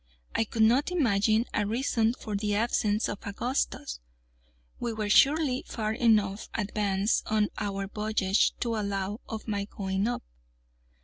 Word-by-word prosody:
I 225 - +1
could 220 +1 +1
not 250 +8 +4
imagine 225 - +2
a 205 -1 +1
reason 230 0 +1
for 215 -4 -5
the 205 0 0
absence 215 -1 +1
of 205 - -4
Augustus. 200 - -2 0.8
We 235 -1 -2
were 215 -1 -2
surely 275 0 +4
far 215 -2 -2
enough 215 -4 +2
advanced 205 -1 0
on 215 -1 +2
our 195 -1 -2
voyage 210 -1 +1
to 230 -2 0
allow 200 0 -2
of 220 0 -6
my 200 -2 -1
going 195 0 -2
up. 245 - -2
215 Hz, 140 wpm, -28 LUFS, 200-230 Hz, 0.8 s, not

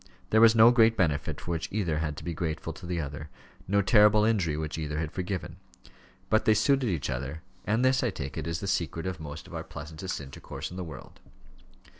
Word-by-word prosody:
There 110 - +5
was 115 0 +7
no 115 +1 +8
great 115 -2 +4
benefit 75 -3 0
for 85 - -5
which 80 -2 -2
either 85 -7 0
had 75 -2 -3
to - - -8
be 85 +1 -3
grateful 80 0 -3
to 85 +2 -10
the 90 -1 -2
other; 75 0 -5 0.4
no 100 +1 +2
terrible 105 +2 +6
injury 95 -9 +1
which 80 +1 -4
either 75 -1 -3
had 80 -1 -2
forgiven. 90 -2 -4 0.7
But 110 - +2
they 110 - +5
suited 130 +3 +2
each 75 -7 -2
other; 70 +5 -5 0.2
and 110 +5 +2
this, 130 0 +3
I 120 - +1
take 70 -8 -6
it, - - -4
is 85 0 -3
the 100 - -4
secret 85 -2 -1
of 95 -3 -3
most 75 -2 -8
of - - -13
our - - -4
pleasantest 80 +5 -6
intercourse 70 +3 -7
in 90 - -8
the 95 - -3
world. 80 - -10
85 Hz, 220 wpm, -28 LUFS, 75-105 Hz, 0.7 s, no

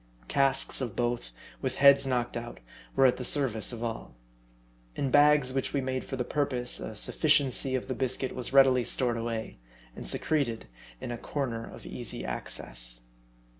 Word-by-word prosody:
Casks 135 0 +2
of 120 -5 -3
both, 120 - -1 0.3
with - - -2
heads 140 0 +6
knocked 125 -2 -1
out, 120 0 -6 0.4
were 135 - +5
at 125 -1 +4
the 125 - -5
service 125 -6 +1
of 120 -1 -5
all. 115 - -5 0.8
In 135 -2 -1
bags 145 -2 +5
which 135 -1 -1
we 140 - +1
made 130 -1 -2
for 135 - -5
the 125 - -1
purpose, 125 -2 -1
a 110 - -6
sufficiency 135 +1 +2
of 130 - -3
the 130 - -2
biscuit 130 +1 -1
was 125 -2 -4
readily 135 -2 +6
stored 120 0 0
away, 115 - -4 0.4
and - - -6
secreted 120 - -1 0.3
in - - -5
a 120 - -5
corner 120 -6 -3
of - - -12
easy - - -5
access. - - -1
125 Hz, 170 wpm, -29 LUFS, 120-135 Hz, 0.8 s, heads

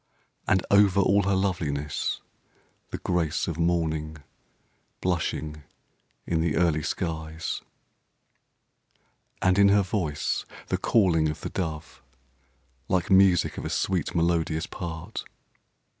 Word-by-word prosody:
And 95 -1 +2
over 100 -1 +5
all 100 +1 +4
her 100 - +3
loveliness, 75 -7 -1 0.7
the - - -4
grace 85 -4 -1
Of 85 -1 -4
Morning 80 -2 0 0.8
blushing 80 -3 -2 0.6
in 80 -2 0
the 80 -2 0
early 85 -3 +2
skies. 80 0 -3 1.8
And 95 +1 +4
in 100 0 +7
her 100 0 +4
voice, 90 -7 -1 0.3
the - - 0
calling 85 -8 +3
of 75 - -5
the - - -5
dove; 80 -6 -4 0.9
Like 95 +2 0
music 95 -3 +4
of - - -6
a - - -2
sweet, 90 -4 -1
melodious 85 -1 +1
part. 85 +2 -6
85 Hz, 115 wpm, -26 LUFS, 80-95 Hz, 1.8 s, in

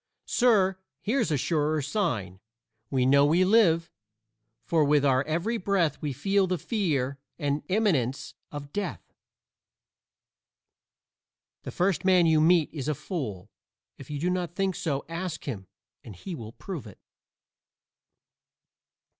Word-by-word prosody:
Sir, 195 -6 +3 0.2
here's 230 0 0
a 150 - +1
surer 155 +2 0
sign: 125 - -2 0.5
We 130 -2 +1
know 140 +2 +5
we 165 +6 +4
live, 175 -6 +4 0.7
for 165 -2 +2
with 145 0 +3
our 130 -1 +3
every 175 +10 -1
breath 180 -7 0
we 150 - -2
feel 195 +8 +1
the 180 0 0
fear 145 - -1 0.2
and 145 -1 -1
imminence 165 - 0 0.2
of 145 -1 -8
death. 205 -1 -5 2.5
The - - -7
first 180 -1 0
man 185 -2 +5
you 160 -1 +4
meet 165 -1 +4
is 145 -4 -5
a 150 - 0
fool. 120 - -5 0.5
If 135 - -11
you 150 - -4
do 175 +4 0
not 180 -2 -3
think 195 -1 0
so 155 -7 -2
ask 165 0 -5
him 100 -9 -6 0.4
and 110 -5 -10
he 180 - -7
will 115 -7 -8
prove 170 - -7
it. 100 - -13
160 Hz, 135 wpm, -27 LUFS, 140-185 Hz, 2.5 s, know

